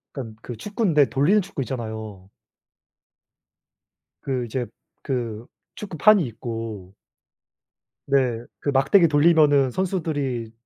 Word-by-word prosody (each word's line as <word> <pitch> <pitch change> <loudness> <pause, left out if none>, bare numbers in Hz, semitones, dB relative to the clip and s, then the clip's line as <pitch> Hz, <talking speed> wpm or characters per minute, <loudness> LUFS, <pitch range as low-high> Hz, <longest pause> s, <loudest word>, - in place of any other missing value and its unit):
약간 115 -5 -6
그 120 - -7
축구인데 175 - +1
돌리는 165 +11 +3
축구 190 -6 -6
있잖아요. 110 -6 -6 1.9
그 130 -3 -2
이제 120 +2 -3 0.4
그 120 -4 -4 0.3
축구판이 195 0 +3
있고 115 -4 -7 1.1
네. 130 -4 +1 0.2
그 - - -2
막대기 140 +7 +4
돌리면은 145 -3 +4
선수들이 145 - -2
135 Hz, 220 characters per minute, -23 LUFS, 115-160 Hz, 1.9 s, 막대기